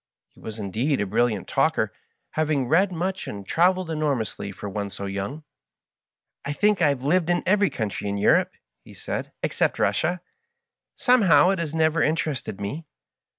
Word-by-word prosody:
He - - -23
was 110 0 -7
indeed 115 +8 -1
a 105 - 0
brilliant 110 0 0
talker, - - +1 0.4
having 150 -4 0
read 185 +7 +3
much 185 +2 -3
and 100 -1 -7
traveled 180 - +2
enormously 135 -10 -2
for 100 - -8
one 100 0 -3
so 100 +1 -7
young. 100 +10 -4 0.5
" - - -65
I 145 - -3
think 205 +4 +2
I 155 - +5
have 135 -3 -2
lived 170 +4 +2
in 175 0 +1
every 205 +1 +3
country 105 -2 -3
in 100 - -2
Eu 100 - +4
rope," - - +3 0.3
he - - -14
said, - - -5
" - - -54
except - - 0
Russia. 175 +3 +1 0.8
Somehow 195 - +5
it 195 - -1
has 165 -2 -3
never 160 0 +2
interested 155 -9 -1
me." 145 +11 -5
150 Hz, 175 wpm, -24 LUFS, 105-175 Hz, 0.8 s, I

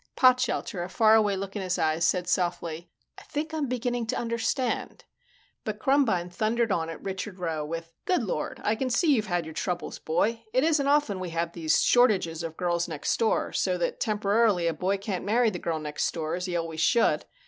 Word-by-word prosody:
Potshelter, 250 -7 +2
a 175 - -6
faraway 215 -1 +4
look 195 +1 -5
in 205 - -2
his 185 -1 -1
eyes, 160 +1 +1
said 180 0 +1
softly, 175 -2 -1 0.3
"I - - -14
think 310 +2 -4
I'm 305 -3 -1
beginning 245 -1 -2
to - - -1
understand 235 +2 -2 0.3
" - - -36
But 215 -1 -3
Krumbine 220 -10 +2
thundered 225 +4 0
on 165 -3 0
at 165 - -8
Richard 190 0 -5
Rowe 165 -4 -2
with, 165 +2 -6
"Good 360 -9 +1
Lord, 200 - -3
I 215 - +2
can 255 +4 -2
see 295 +5 +3
you've 215 -5 0
had 175 -3 -1
your 160 - -8
troubles, 175 +1 -3
boy. 215 +8 0
It 255 - +3
isn't 305 -3 +2
often 285 -9 +2
we 185 -1 -4
have 165 0 -2
these 160 -2 +2
shortages 195 -10 +3
of 165 -1 -6
Girls 175 -1 0
Next 155 -4 -1
Door, 225 -1 +1
so 185 -2 +1
that 175 - -2
temporarily 210 -3 +2
a 165 - +1
boy 185 +5 0
can't 195 -2 -4
marry 225 +3 +2
the 180 - -5
Girl 165 -2 -2
Next 150 -1 -2
Door, 160 -2 -3
as 180 - -4
he 180 - -3
always 165 -2 -2
should. 235 +6 +3
195 Hz, 205 wpm, -27 LUFS, 170-235 Hz, 0.3 s, faraway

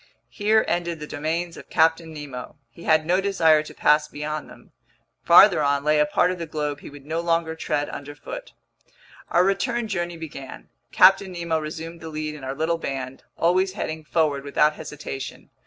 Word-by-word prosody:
Here 215 +1 +2
ended 170 -1 -1
the 150 - -6
domains 160 +3 -3
of - - -12
Captain 160 0 +2
Nemo. 145 -5 -8 0.2
He 170 - -13
had 155 -1 +3
no 180 +3 +2
desire 165 -6 +4
to 155 - -10
pass 150 0 +3
beyond 150 +1 -5
them. - - -16 0.5
Farther - - +7
on 140 -1 +1
lay 150 0 +3
a 150 - +3
part 180 +4 +2
of 180 - -5
the 165 - -4
globe 150 -2 -3
he - - -10
would 140 -1 -13
no 160 +2 -2
longer 165 -1 0
tread 150 -2 -2
underfoot. 325 - -8 0.8
Our 175 - +4
return 230 +5 0
journey 175 -4 -3
began. 145 -4 -9 0.2
Captain 190 +1 +5
Nemo 170 -2 -1
resumed 160 +2 -7
the 160 - -7
lead 155 0 -4
in 150 -3 -10
our 135 +1 -4
little 165 +3 0
band, 135 -3 -5 0.2
always 185 +3 +2
heading 160 -5 -4
forward 150 -3 0
without 150 +2 +2
hesitation. 140 -4 -8
160 Hz, 180 wpm, -24 LUFS, 150-175 Hz, 0.8 s, Farther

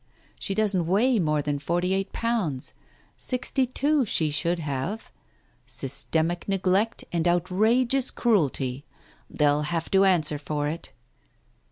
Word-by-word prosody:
She 195 - -3
doesn't 195 -5 +1
weigh 225 +6 +3
more 155 -4 +1
than 145 0 -1
forty 175 +5 0
eight 195 0 -1
pounds. 210 - -2 0.4
Sixty 255 +1 -1
two 285 +3 +1
she 160 -8 0
should 170 +4 0
have. 155 +7 -4 0.6
Systematic 165 +3 -2
neglect 195 +3 +1
and 170 0 0
outrageous 220 +9 +2
cruelty! 140 - 0 0.5
They'll 145 -1 +2
have 165 +2 -2
to 195 0 +5
answer 160 -6 +2
for 145 0 -2
it." 160 +3 -5
175 Hz, 125 wpm, -26 LUFS, 150-215 Hz, 0.6 s, to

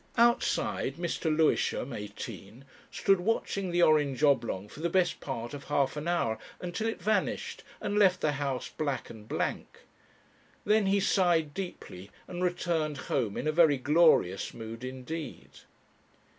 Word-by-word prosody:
Outside, 235 +1 +2
Mr. 170 0 -4
Lewisham 155 -4 +1
(eighteen) 105 +2 -8 0.2
stood 195 -1 +2
watching 195 -1 -1
the 175 0 +3
orange 150 -3 +3
oblong 120 -9 +2
for 125 - -13
the 170 +2 0
best 180 -1 +1
part 120 -3 -5
of 140 -1 -8
half 140 -2 +1
an 150 +2 -4
hour, 115 -11 0 0.2
until 180 +5 -3
it 225 - -3
vanished 215 +1 -1 0.2
and 205 +1 -1
left 185 -3 +5
the 155 - +1
house 140 -2 -2
black 140 -5 -3
and 110 -2 -12
blank. - - -3 0.8
Then 210 -1 +3
he 200 +1 +3
sighed 175 -6 +2
deeply 175 - -7 0.2
and 180 0 -4
returned 165 -4 0 0.2
home 115 -7 0
in - - -3
a - - +3
very 155 -3 +5
glorious 145 - +3
mood 115 +1 -7
indeed. 130 +5 -6
155 Hz, 145 wpm, -29 LUFS, 130-175 Hz, 0.8 s, left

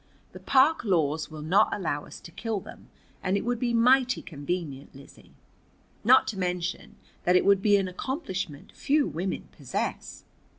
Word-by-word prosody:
The - - -11
park 275 +3 +3
laws 160 -7 0
will 155 -1 -8
not 195 +7 +3
allow 150 -7 -2
us - - -11
to 170 - -12
kill 220 +3 -3
them, - - -13 0.3
and 190 +2 0
it - - -4
would 245 -1 -1
be 240 -1 0
mighty 255 +2 +3
convenient, 145 -3 -5
Lizzie. 135 0 -16 0.7
Not 255 +4 +6
to 200 - -5
mention 180 -1 -3 0.3
that 180 - +3
it - - +4
would 200 -1 +4
be 205 0 +4
an 195 -1 0
accomplishment 190 - -5
few 290 +1 +1
women 175 +4 -4
possess." - - -4
190 Hz, 165 wpm, -27 LUFS, 165-235 Hz, 0.7 s, Not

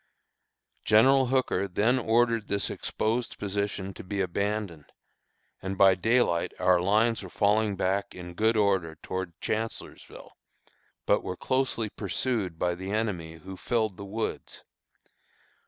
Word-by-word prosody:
General 130 +5 +5
Hooker 125 -7 +1
then 110 +7 +2
ordered 115 -1 +2
this 100 0 -1
exposed 115 +3 -2
position 100 -1 -3
to - - -10
be 100 +2 -4
abandoned, 100 -3 -2 0.7
and 95 0 -4
by 95 -1 +7
daylight 95 -3 +1
our 90 -1 +3
lines 110 +5 +2
were - - -9
falling 105 0 +2
back 95 +2 -1
in 90 -1 -8
good 110 +5 +2
order 95 -6 +1
towards 95 -2 -4
Chancellorsville, 110 +1 -5 0.7
but - - +3
were 90 - -5
closely 130 -4 0
pursued 100 -3 -2
by 90 +1 0
the 95 +2 -6
enemy, 100 -7 -2
who 95 +4 -9
filled 110 0 -1
the - - -7
woods. 110 +3 -5
100 Hz, 130 wpm, -28 LUFS, 95-110 Hz, 0.7 s, by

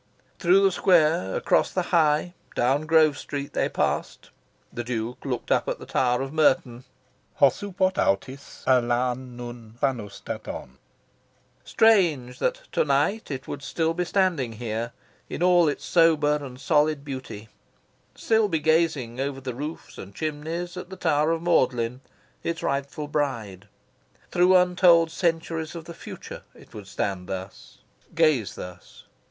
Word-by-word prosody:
Through 185 +2 +4
the 195 - +4
square, 160 - +3
across - - +2
the - - -1
High, 155 +1 +3 0.2
down 135 +5 +1
Grove 155 -2 +4
Street, 140 -1 -5
they - - 0
passed. - - -2 0.4
The 120 - -4
Duke 120 0 -4
looked 125 -4 -4
up - - +2
at - - -2
the - - -11
tower 125 0 +1
of 135 +2 -7
Merton, 130 -5 +2 0.5
"os 140 -2 +4
oupot 190 -1 0
authis 130 +8 -2
alla 125 -1 +3
nyn 120 -3 -10
paunstaton." 105 - -4 0.8
Strange 170 - +3
that - - -1
to - - +2
night 145 +10 0
it 135 -3 -5
would 140 - -6
still 165 +3 -1
be 180 +2 -1
standing 175 - 0
here, 115 +1 -4 0.4
in - - -3
all 175 -2 +5
its 145 - -2
sober 155 -3 +4
and 130 -2 -9
solid 150 0 +1
beauty 130 -6 -7 0.7
still 220 -1 +2
be 165 -5 0
gazing, 155 -7 +1
over 135 0 -2
the 130 -2 -5
roofs 150 +6 -7
and 100 +1 -10
chimneys, 160 +3 -4
at 180 0 -7
the 190 - -9
tower 155 -3 +2
of 165 0 -1
Magdalen, 125 -7 +1 0.4
its 170 0 -3
rightful 140 +2 -2
bride. 115 -10 -3 0.6
Through 180 +1 +5
untold 180 -2 +4
centuries 165 -2 -2
of 165 -1 -7
the 170 - -8
future - - -9
it - - -18
would 105 -2 -9
stand 95 -2 -3
thus, 95 0 -7 0.4
gaze 155 - +2
thus. 90 -1 -11
145 Hz, 145 wpm, -25 LUFS, 125-165 Hz, 0.8 s, all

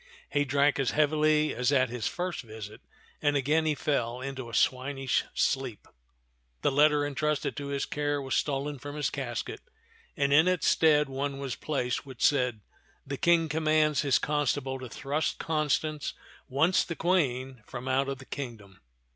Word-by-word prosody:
He 145 0 +2
drank 140 +1 +2
as 135 - +2
heavily 155 0 +3
as 125 +3 +1
at 130 -3 +3
his 120 -1 -3
first 180 0 -3
visit, 110 -3 -9 0.4
and 145 -1 +2
again 155 +4 +2
he 155 - +2
fell 125 -5 -1
into 130 -2 -5
a - - -12
swinish 135 0 +1
sleep. 130 -5 -1 0.8
The - - +3
letter 145 +1 +4
intrusted 145 +1 -1
to 145 -1 -4
his 140 -1 -1
care 145 0 -1
was 135 -1 -4
stolen 145 0 -1
from 145 +3 -7
his 150 -2 -1
casket, 125 -4 -4 0.6
and 140 0 +2
in 160 +4 +6
its 185 -2 +1
stead 150 -2 +4
one 135 +1 -3
was 135 -4 -4
placed 130 -5 -2
which 130 -4 -2
said: 125 -6 +2 0.4
"The 140 0 -4
King 170 0 +3
commands 155 -1 +2
his 140 -3 +3
con 150 -1 0
stable 135 +1 -1
to 130 -1 -7
thrust 145 +6 -2
Constance, 155 -1 -1 0.3
once 160 +8 +3
the 170 - -5
Queen, 135 -8 0
from 125 +1 -7
out 135 +1 +1
the 135 - -12
kingdom. 110 -10 -8
140 Hz, 165 wpm, -29 LUFS, 130-150 Hz, 0.8 s, in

